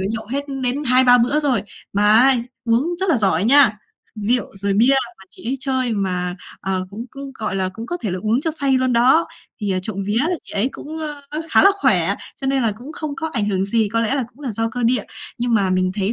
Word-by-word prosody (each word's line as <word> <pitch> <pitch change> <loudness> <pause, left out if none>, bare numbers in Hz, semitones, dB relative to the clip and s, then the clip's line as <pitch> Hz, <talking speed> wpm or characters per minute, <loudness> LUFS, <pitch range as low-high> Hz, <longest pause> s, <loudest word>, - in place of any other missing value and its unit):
phải 190 - -1
nhậu 225 -1 -4
hết 280 +1 -2 0.2
đến 260 +4 0
2-3 250 -1 +5
bữa 265 +6 +2
rồi. 260 -8 +1 0.3
Mà 205 +1 +1
á 255 +4 +6 0.3
uống 235 +6 +2
rất 385 - 0
là 310 - +4
giỏi 195 -4 +1
nha, 270 -1 +6 0.4
rượu 220 +2 0
rồi 200 0 -1
bia 240 +7 +4 0.2
mà 190 - -15
chị - - -14
ấy 270 - -1
chơi 260 -3 0
mà, 180 -3 -1 0.3
ờ, 185 -1 -2
cũng 225 +5 -7
cũng, 275 0 -8
gọi 215 -5 -4
là, 185 -1 0
cũng 225 +3 -8
có 350 - -3
thể 210 - -2
là 185 - -3
uống 225 +4 +1
cho 320 - 0
say 280 -3 0
luôn 255 -1 +2
đó. 255 +8 +4 0.3
Thì, 205 -2 -2
à, 185 - 0
trộm 200 +1 -5
vía 210 +2 -1
là 340 +5 +1
chị - - -13
ấy 210 +6 +1
cũng, 315 +2 -8 0.3
ờ, 305 +2 -3
khá - - +6
là 395 - +7
khỏe, - - +3 0.3
cho 270 - -3
nên 270 -1 +1
là 220 -2 +1
cũng 250 +9 -11
không 310 -3 -5
có 320 -1 -3
ảnh 210 -4 0
hưởng 190 -1 0
gì, 215 +1 +1
có 230 +2 0
lẽ 230 +4 0
là 270 -4 -1
cũng 250 +4 -23
là 270 - -4
do 225 +2 -1
cơ 245 +1 -4
địa. 245 +2 +2 0.4
Nhưng 240 -1 0
mà 195 -3 +2
mình 185 0 +1
thấy 205 +1 0
235 Hz, 255 wpm, -20 LUFS, 205-270 Hz, 0.4 s, là